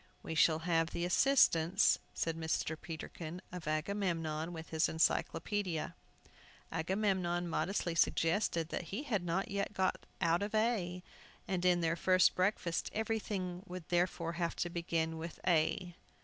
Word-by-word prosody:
"We - - -4
shall 160 0 +4
have 165 -2 +2
the 170 - -2
assistance," 185 -5 +4 0.2
said 165 -1 -1
Mr. 160 0 -1
Peterkin, 160 +1 -7
"of 180 -3 -7
Agamemnon, 165 -1 -1
with 165 -1 -8
his 160 0 +2
Encyclopædia." 175 +2 0 0.8
Agamemnon 180 -1 0
modestly 175 +1 -1
suggested 165 0 +1
that 175 - -3
he 205 - -4
had 215 -10 -1
not 190 +6 -1
yet 200 +1 -2
got 190 -2 -1
out 170 +2 +2
of 205 +2 -2
A, 195 -6 0 0.4
and 185 -2 -1
in 180 -1 +4
their 165 0 +1
first 185 +2 +4
breakfast 180 -2 0
everything 205 -5 -2
would 180 -2 -7
therefore 175 -1 +1
have 170 0 -2
to 175 - -2
begin 165 -1 -1
with 165 +1 -7
A. 175 +1 +2
175 Hz, 140 wpm, -34 LUFS, 165-190 Hz, 0.8 s, shall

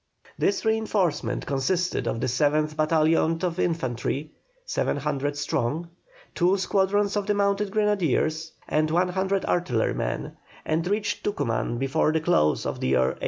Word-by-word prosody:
This 200 +2 0
reinforcement 190 - 0
consisted 170 +7 0
of 115 - -2
the - - +1
7th 150 +4 +1
battalion 160 +1 +2
of 180 -1 -1
infantry, 145 -2 -1 0.3
700 145 - -1
strong, 145 +3 -1 0.4
two 185 +2 +3
squadrons 200 +2 +1
of 205 -1 -1
the 205 - +2
mounted 200 0 +1
grenadiers, 165 - 0 0.2
and 155 +1 +1
100 190 +3 +1
artillerymen, 130 -11 -1 0.3
and 165 +2 0
reached 205 +1 -1
Tucuman 120 - -1
before 135 +4 +1
the 160 - +2
close 155 - +2
of - - -3
the - - -1
year 65 - +3
1813. - - -7
165 Hz, 135 wpm, -25 LUFS, 145-195 Hz, 0.4 s, two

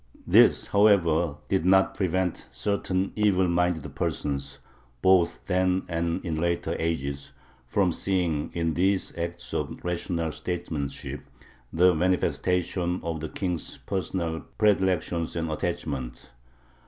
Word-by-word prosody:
This, - - +5
however, 85 -7 +4
did 95 -4 +1
not 95 +1 +4
prevent 95 -2 -1
certain 95 -2 -1
evil 100 -4 +3
minded 85 -4 0
persons, 70 -4 -2 0.5
both 90 -3 +3
then 95 0 +1
and 85 +2 -2
in 80 -3 -2
later 85 0 0
ages, 70 -4 -3 0.3
from 95 +6 +2
seeing 85 -5 0
in 85 -1 0
these 95 +3 +1
acts 85 0 -5
of - - -2
rational 85 -2 -2
statesmanship 80 -3 -4 0.5
the 90 +2 +5
manifestation 90 +1 0
of 80 -1 -3
the 80 0 -5
King's 90 -4 -3
personal 85 -3 -3 0.2
predilections 95 -5 +1
and 80 -1 -2
attachments. 65 -5 -4
85 Hz, 115 wpm, -26 LUFS, 80-95 Hz, 0.5 s, This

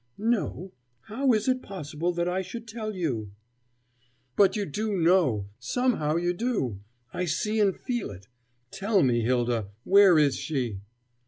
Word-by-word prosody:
"No. 205 -4 -1 0.3
How 260 - 0
is 215 0 +1
it 255 0 +1
possible 170 -2 -4
that 170 0 -1
I 180 +2 0
should 225 +5 -8
tell 220 -2 -5
you?" 120 - -3 1.0
"But 195 -2 +4
you 205 -2 -1
do 205 +6 -2
know! 160 - +2
Somehow 155 - 0
you 175 +1 +1
do! 180 - -2 0.3
I 180 - -1
see 215 +6 -1
and 200 -3 +2
feel 240 -4 -3
it. 100 0 -11 0.4
Tell 200 0 +1
it - - +3
me, 120 -3 +2
Hylda! 120 -2 0 0.2
Where 195 -3 +6
is 145 -4 +3
she?" 125 -10 -3
180 Hz, 155 wpm, -27 LUFS, 130-215 Hz, 1.0 s, Where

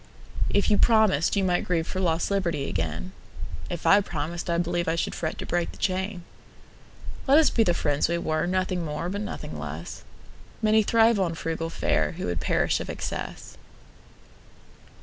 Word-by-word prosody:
If 200 +1 +2
you 205 - +4
promised, 215 -9 +4
you 200 - +2
might 180 -1 +1
grieveFor 175 +2 -1
lost 165 0 +1
liberty 170 -8 0
again:If 80 - -6
I 200 +1 +6
promised, 170 0 -4
I 170 - +2
believeI 175 -1 0
should - - -1
fret 160 -2 -3
to - - -5
break 175 -1 -1
the - - -14
chain. 190 -1 -2 1.0
Let 275 +2 +6
us 320 - +5
be 230 - +2
the 175 -6 +3
friends 145 -1 +1
we 170 - +1
were, 155 0 -1
Nothing 185 -1 0
more 155 +2 -3
but 200 +2 -3
nothing 210 - -6
less:Many 220 0 -3
thrive 225 0 +4
on 170 -3 0
frugal 165 0 -3
fareWho 170 +1 -1
would 85 -1 -2
perish - - +1
of - - -6
excess. - - -5
175 Hz, 155 wpm, -26 LUFS, 160-195 Hz, 1.0 s, I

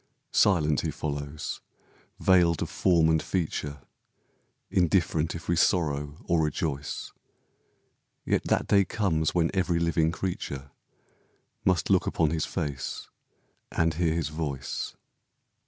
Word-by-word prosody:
Silent 75 -7 +3
he 80 - -2
follows, 75 -1 -4 0.6
veiled 85 -4 +4
of - - -6
form 85 -3 +3
and 80 -1 +3
feature, 75 -6 -3 0.9
Indifferent 85 -3 +2
if 85 - -8
we 85 - +2
sorrow 75 -4 +1
or 85 -2 +2
rejoice, 75 -2 -2 1.1
Yet - - +1
that - - +1
day 100 -1 +4
comes 85 -6 0
when 85 -2 +2
every 90 -3 +1
living 85 -1 +2
creature 70 -7 -4 0.9
Must 90 0 +2
look 95 - +3
upon 80 -2 +1
his 80 -2 0
face 70 -4 -4 0.6
and 80 -1 +1
hear 80 0 +1
his 80 -4 -1
voice. 75 -4 -4
80 Hz, 120 wpm, -27 LUFS, 75-85 Hz, 1.1 s, veiled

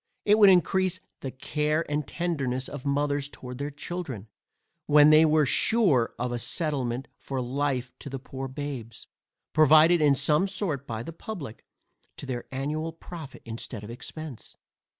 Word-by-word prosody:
It 210 +1 +5
would 205 -2 +9
encrease 185 0 +3 0.2
the 135 - -4
care 150 +4 -1
and 150 -1 -2
tenderness 140 -7 -2
of 145 -1 -7
mothers 145 0 0
towards 125 -2 -9
their 145 +1 -2
children, 145 - -6 0.6
when 150 0 +7
they 155 +1 +7
were 155 -1 +4
sure 150 - +2
of 125 0 -2
a 120 - -2
settlement 135 -4 -2
for 135 -1 -4
life 130 0 -1
to - - -7
the 135 - -4
poor 135 +1 -6
babes, 130 -4 -6 0.5
provided 155 +2 +6
in 145 -2 +5
some 150 +6 +2
sort 175 -8 -3
by 110 0 -4
the 165 - -7
publick, 160 - -7 0.5
to - - -7
their 125 -3 -4
annual 150 +4 -2
profit 160 -3 -10
instead 115 -1 -7
of 105 - -8
expence. 135 +2 -8
145 Hz, 155 wpm, -27 LUFS, 130-155 Hz, 0.6 s, would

